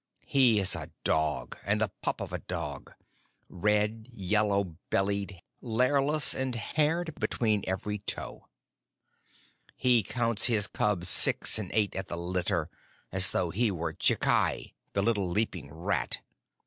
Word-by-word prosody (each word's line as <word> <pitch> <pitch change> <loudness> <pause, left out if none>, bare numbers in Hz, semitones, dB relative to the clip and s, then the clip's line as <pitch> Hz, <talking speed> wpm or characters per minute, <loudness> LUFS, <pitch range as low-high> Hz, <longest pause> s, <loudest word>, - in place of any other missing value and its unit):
He 125 -6 +4
is 95 -1 +2
a 80 -1 -6
dog 80 0 -1
and 105 +1 0
the 110 -3 0
pup - - -2
of - - -6
a - - -2
dog 85 -6 -6 0.6
red, 105 +4 0
yellow 100 -4 0
bellied, 100 -2 -1 0.2
lairless, 135 +5 +3
and 130 -2 -2
haired 155 +7 0
between 110 -4 0
every 105 +3 -3
toe! 100 - -6 1.3
He 125 -2 +4
counts 115 +2 +2
his 110 -4 +3
cubs 100 -4 -1
six 100 - +4
and 100 -4 -5
eight 105 -2 +1
at 95 0 -4
the 85 - -5
litter, 85 -2 -1 0.4
as 95 -1 +5
though 85 -2 -1
he 115 +5 +1
were 85 -4 -3
Chikai, - - +1 0.2
the 100 - +1
little 100 -4 +1
leaping 90 -6 -2
rat. 85 +4 -1
100 Hz, 135 wpm, -29 LUFS, 90-115 Hz, 1.3 s, as